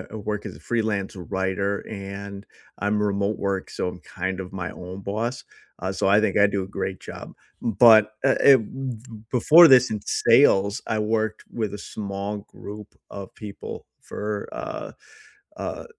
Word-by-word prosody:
I - - -10
work 105 0 -4
as - - -7
a - - -15
freelance 110 -5 -2
writer, 95 +2 -2
and 100 -1 -7 0.3
I'm 105 +1 0
remote 100 0 0
work, 100 -1 -2
so 90 - -2
I'm, 90 - -8
kind 95 +2 -4
of, 90 -1 -8
my 90 -2 -4
own 90 +2 -8
boss, 110 +6 -3 0.4
uh, 95 - -2
so 95 - 0
I 100 +2 +5
think 105 -3 0
I 105 - +7
do 100 -1 -1
a - - -9
great 95 -1 -4
job, - - -9 0.3
but, 110 -1 +6
uh, 135 - +4
eh, 140 - +8
b 130 +2 -5 0.4
before 155 +7 +8
this 125 -2 +6
in 105 -1 -2
sales, 100 -5 +4
I 110 - -1
worked 110 0 -1
with 110 -3 -3
a - - -6
small 100 0 -5
group 105 0 -10 0.2
of 100 -1 -8
people 105 -2 -8 0.2
for, 105 -1 -4
uh - - -6 0.6
uh, - - -5
105 Hz, 170 wpm, -24 LUFS, 100-110 Hz, 0.6 s, eh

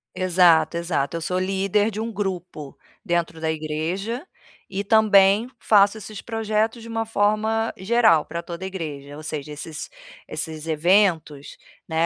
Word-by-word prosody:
Exato, 175 -3 +4
exato, 170 -3 -1
eu - - -6
sou 180 +2 -1
líder 195 +3 +1
de 215 +2 -4
um 230 - -3
grupo 180 -8 -5 0.3
dentro 170 -1 -1
da 160 0 -1
igreja, 165 - -3 0.4
e 195 +1 -3
também 205 0 +5
faço 205 0 +4
esses 215 0 -8
projetos 225 0 -1
de 230 - -10
uma 225 0 -2
forma 220 +1 +1
geral 190 -6 +3
pra 170 +1 -5
toda 170 +2 -8
a - - -2
igreja, 145 -6 -6
ou 155 - -10
seja, 150 -1 -5
esses 150 +1 -7 0.4
esses 155 0 -4
eventos, 160 -3 +1 0.3
né, 160 +1 +1
185 Hz, 150 wpm, -23 LUFS, 160-215 Hz, 0.4 s, também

